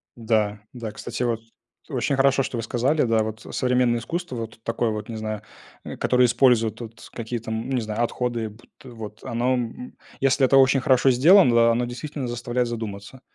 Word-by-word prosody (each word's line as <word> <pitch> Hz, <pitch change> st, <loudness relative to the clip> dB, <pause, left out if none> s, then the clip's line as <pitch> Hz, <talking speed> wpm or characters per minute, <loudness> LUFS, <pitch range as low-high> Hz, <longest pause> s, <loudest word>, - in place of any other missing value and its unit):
Да, 110 Hz, -3 st, 0 dB
да, 115 Hz, -3 st, -6 dB
кстати, 120 Hz, +3 st, -5 dB
вот, 115 Hz, -2 st, 0 dB, 0.5 s
очень 140 Hz, -, 0 dB
хорошо, 135 Hz, 0 st, +3 dB
что 125 Hz, -, -4 dB
вы 115 Hz, -, -3 dB
сказали, 130 Hz, +7 st, +1 dB
да, 115 Hz, -2 st, +2 dB
вот. 110 Hz, 0 st, -6 dB
Современное 125 Hz, -2 st, +1 dB
искусство, 170 Hz, +2 st, -4 dB
вот 115 Hz, -1 st, -6 dB
такое 115 Hz, 0 st, -1 dB
вот, 110 Hz, +1 st, -5 dB
не 115 Hz, -, -5 dB
знаю, 110 Hz, -1 st, -4 dB, 0.4 s
э, -, -, -7 dB
которое 125 Hz, 0 st, +3 dB
использует, 120 Hz, -3 st, +3 dB
вот, 115 Hz, 0 st, -10 dB
какие 115 Hz, 0 st, -4 dB
там, 110 Hz, +2 st, -4 dB
ну, 135 Hz, -, 0 dB
не 125 Hz, -, 0 dB
знаю, 110 Hz, +1 st, -2 dB
отходы, 120 Hz, -2 st, -2 dB
бут 110 Hz, +3 st, -18 dB
вот 110 Hz, -4 st, -10 dB
оно, 120 Hz, +2 st, 0 dB
м 125 Hz, 0 st, -4 dB, 0.3 s
Если 135 Hz, 0 st, +3 dB
это 135 Hz, +1 st, +4 dB
очень 135 Hz, 0 st, +5 dB
хорошо 130 Hz, -1 st, +4 dB
сделано, 155 Hz, +2 st, +6 dB
да, 115 Hz, 0 st, +5 dB
оно 120 Hz, +1 st, 0 dB
действительно 130 Hz, +2 st, -5 dB
заставляет 120 Hz, +1 st, -2 dB
задуматься, 110 Hz, +1 st, -6 dB
120 Hz, 190 wpm, -24 LUFS, 110-130 Hz, 0.5 s, сделано